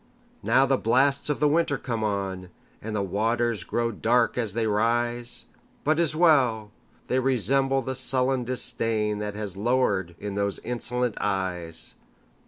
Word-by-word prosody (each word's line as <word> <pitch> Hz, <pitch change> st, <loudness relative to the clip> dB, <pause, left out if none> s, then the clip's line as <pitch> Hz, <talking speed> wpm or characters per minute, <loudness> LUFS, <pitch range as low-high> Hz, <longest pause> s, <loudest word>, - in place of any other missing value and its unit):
Now 125 Hz, +6 st, +4 dB
the 135 Hz, -1 st, +1 dB
blasts 135 Hz, +5 st, +2 dB
of 150 Hz, -, -1 dB
the 150 Hz, -, +3 dB
winter 150 Hz, -1 st, +2 dB
come 115 Hz, -3 st, -3 dB
on, 95 Hz, -3 st, -3 dB, 0.3 s
And 110 Hz, 0 st, -5 dB
the 100 Hz, -, 0 dB
waters 110 Hz, +2 st, 0 dB
grow 115 Hz, 0 st, -1 dB
dark 115 Hz, +2 st, +1 dB
as 110 Hz, -5 st, -2 dB
they 115 Hz, -1 st, 0 dB
rise! 120 Hz, +3 st, 0 dB, 0.4 s
But 155 Hz, +2 st, +2 dB
't -, -, +3 dB
is 155 Hz, -2 st, +1 dB
well!—they 130 Hz, -6 st, +1 dB
resemble 135 Hz, +2 st, +1 dB
the 130 Hz, +2 st, -4 dB
sullen 130 Hz, 0 st, +2 dB
disdainThat 105 Hz, -4 st, -1 dB
has 105 Hz, -3 st, -4 dB
lowered 100 Hz, -6 st, 0 dB
in 105 Hz, -1 st, -5 dB
those 100 Hz, 0 st, -1 dB
insolent 125 Hz, 0 st, -2 dB
eyes. 90 Hz, -4 st, -2 dB
115 Hz, 145 wpm, -26 LUFS, 105-130 Hz, 0.4 s, Now